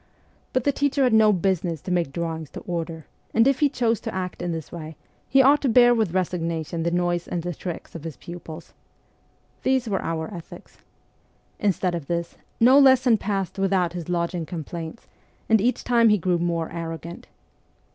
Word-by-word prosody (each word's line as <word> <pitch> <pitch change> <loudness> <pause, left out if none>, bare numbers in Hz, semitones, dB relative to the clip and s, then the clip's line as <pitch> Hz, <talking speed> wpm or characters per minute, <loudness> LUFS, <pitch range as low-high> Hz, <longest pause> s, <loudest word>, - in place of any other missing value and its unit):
But 255 - 0
the 285 - +3
teacher 280 0 +1
had 250 -3 +3
no 220 -1 +6
business 180 -3 0
to 185 - -5
make 175 -6 0
drawings 160 -1 -4
to - - -7
order; 165 -2 -5 0.3
and 225 +3 +5
if 275 -1 +2
he 295 -2 +4
chose 230 -5 0
to - - -6
act 185 -1 -4
in 175 0 -2
this 160 -2 -5
way, 160 -2 -7 0.3
he 270 0 +5
ought 285 +3 +5
to 275 - +1
bear 240 +1 +6
with 215 -7 0
resignation 170 -3 -2
the 170 - +1
noise 175 0 0
and 170 -2 -3
the 175 0 -3
tricks 170 +2 -7
of 165 - -8
his 165 -4 -7
pupils. 170 -1 -10 0.9
These 260 -2 +1
were 200 -3 -1
our 165 +3 -3
ethics. 170 -3 -11 0.8
Instead 190 -3 0
of 165 -5 -4
this, 170 0 -3 0.2
no 255 +4 +7
lesson 260 -4 +5
passed 195 -2 -3
without 190 -3 +1
his 175 -2 -6
lodging 170 -1 -1
complaints, 165 +2 -7 0.4
and 220 -2 +4
each 245 +4 0
time 235 -2 +4
he 210 - +4
grew 180 -1 0
more 170 -1 -1
arrogant. 165 0 -6
180 Hz, 185 wpm, -24 LUFS, 165-225 Hz, 0.9 s, no